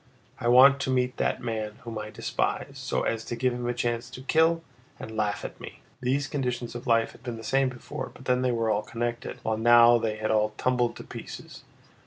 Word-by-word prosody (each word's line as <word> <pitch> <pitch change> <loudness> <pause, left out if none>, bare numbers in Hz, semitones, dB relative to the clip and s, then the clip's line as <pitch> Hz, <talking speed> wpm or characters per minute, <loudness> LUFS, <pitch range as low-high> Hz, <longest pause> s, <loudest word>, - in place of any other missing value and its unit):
I - - -2
want 135 +3 +7
to 130 - -2
meet 125 -1 +1
that - - -1
man 110 -3 -3
whom 115 -2 -5
I 105 0 -6
despise, - - -2
so - - -1
as 115 -1 -1
to 120 - -4
give 125 +1 +1
him 120 0 -3
a - - 0
chance 120 0 -2
to 130 +1 -10
kill 165 +3 +3 0.4
and 110 - -8
laugh 105 -1 -1
at - - -8
me!" - - -10 0.2
These 135 +3 +1
conditions 125 -4 -3
of 120 +1 -7
life 115 -1 +3
had - - -17
been 120 -2 -5
the 115 - -9
same 135 +2 +2
before, 120 -2 -7
but 130 - -15
then 125 0 +2
they 130 -1 +2
were 115 -2 +1
all 105 - +1
connected, 120 +2 -4
while 110 0 0
now 120 +1 +7
they 110 -1 -1
had 110 0 -2
all 105 0 +1
tumbled 125 -2 +1
to - - -9
pieces. - - -9
120 Hz, 225 wpm, -27 LUFS, 115-130 Hz, 0.4 s, want